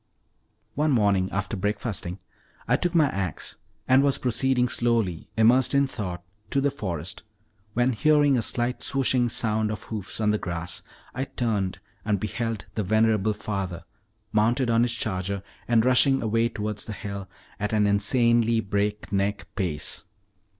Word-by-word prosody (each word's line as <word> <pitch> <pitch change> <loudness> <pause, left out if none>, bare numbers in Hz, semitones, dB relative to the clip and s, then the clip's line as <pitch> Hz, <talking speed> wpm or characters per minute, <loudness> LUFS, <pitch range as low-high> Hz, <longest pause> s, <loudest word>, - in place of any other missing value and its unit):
One 150 +5 +1
morning 100 -7 +3
after 100 +2 -2
breakfasting, 100 -2 -2 0.5
I 125 - +4
took 175 +5 -1
my 160 -3 +6
ax, 95 - -4 0.3
and 130 +1 +6
was 140 -1 +2
proceeding 125 +1 +1
slowly, 115 -9 0
immersed 120 +4 +4
in 140 0 +5
thought, 90 -9 -5 0.3
to 140 - +1
the 140 +1 +2
forest, 95 - -4 0.5
when 125 +2 +2
hearing 145 +2 +4
a 120 - +2
slight 120 +2 -1
swishing 130 -2 +1
sound 110 -1 0
of 105 - -5
hoofs 105 -3 -6
on 105 -1 +2
the 105 - 0
grass, 85 -1 -3 0.3
I 135 +1 -2
turned 105 -8 -1 0.3
and 105 -2 0
beheld 110 +1 -3
the 110 - -1
venerable 110 +1 +2
father, 95 -5 -4 0.5
mounted 115 +3 +2
on 115 0 +4
his 120 0 +2
charger, 100 -3 -2 0.2
and 115 -1 +3
rushing 135 +1 +4
away 115 +1 +2
towards 105 -2 -3
the 110 - -5
hills 100 -1 -6 0.3
at 105 0 -1
an 105 -1 +3
insanely 115 +2 +3
break 105 0 -2
neck 100 +1 -1
pace. 85 -7 -3
110 Hz, 150 wpm, -26 LUFS, 100-120 Hz, 0.5 s, my